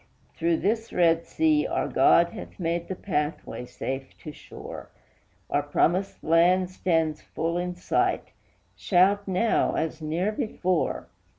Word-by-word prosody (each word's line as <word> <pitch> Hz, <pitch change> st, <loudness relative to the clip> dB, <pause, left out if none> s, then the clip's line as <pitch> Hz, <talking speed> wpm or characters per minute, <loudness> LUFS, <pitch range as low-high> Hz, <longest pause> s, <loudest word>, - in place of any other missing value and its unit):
"Through 165 Hz, 0 st, +1 dB
this 225 Hz, +5 st, -1 dB
red 165 Hz, -1 st, +2 dB
sea 310 Hz, -2 st, +2 dB
our -, -, -1 dB
God 170 Hz, 0 st, +4 dB
hath -, -, -10 dB
made 170 Hz, 0 st, -1 dB
the 190 Hz, -, -4 dB
pathway 150 Hz, -8 st, -3 dB
safe 135 Hz, +2 st, -6 dB
to 155 Hz, -, -6 dB
shore; -, -, -10 dB, 0.6 s
Our -, -, +1 dB
promised 185 Hz, +4 st, 0 dB
land 180 Hz, +3 st, +3 dB
stands 165 Hz, -4 st, 0 dB
full 165 Hz, +1 st, -3 dB
in 180 Hz, 0 st, -3 dB
sight; 180 Hz, -, 0 dB, 0.5 s
shout 200 Hz, +2 st, +3 dB
now 195 Hz, +4 st, +1 dB
as 160 Hz, 0 st, -2 dB
ne'er 165 Hz, +7 st, -1 dB
before!" 185 Hz, -5 st, -1 dB
175 Hz, 130 wpm, -26 LUFS, 165-190 Hz, 0.6 s, God